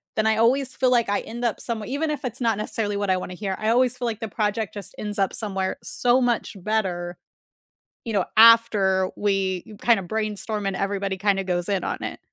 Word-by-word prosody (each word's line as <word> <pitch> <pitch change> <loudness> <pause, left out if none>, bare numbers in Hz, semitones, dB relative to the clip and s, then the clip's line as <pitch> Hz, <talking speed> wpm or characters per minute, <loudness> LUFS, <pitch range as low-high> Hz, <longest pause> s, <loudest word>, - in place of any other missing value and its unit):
then 215 0 +1
I 220 0 +2
always 255 +3 +2
feel 255 -1 +2
like 235 -4 +3
I 205 - +1
end 240 +2 -7
up 235 - 0
somewhe 225 -3 -4
even 295 +4 -1
if 295 -1 -4
it's 250 0 -5
not 225 -3 +2
necessarily 210 -1 -2
what 200 -1 -2
I 185 - +3
wanna 180 0 -6
hear, 195 +1 -3
I 215 - 0
always 250 +1 +3
feel 245 - -3
like 225 -2 -3
the 225 - -4
project 210 0 -1
just 205 -2 -7
ends 210 0 -4
up 195 - +1
somewhere 195 -3 -2
so 245 +1 +2
much 240 -3 0
better, 180 -5 -1 0.9
you 230 - -4
know, 195 -3 +1
after 215 -5 +6
we 195 0 -1
kinda 230 -5 +4
brainstorm 215 +1 -3
and 195 - -1
everybody 195 -1 -2
kinda 195 0 +1
goes 175 -1 -1
in 195 -2 0
on - - -3
it. - - -5
210 Hz, 215 wpm, -24 LUFS, 195-230 Hz, 0.9 s, after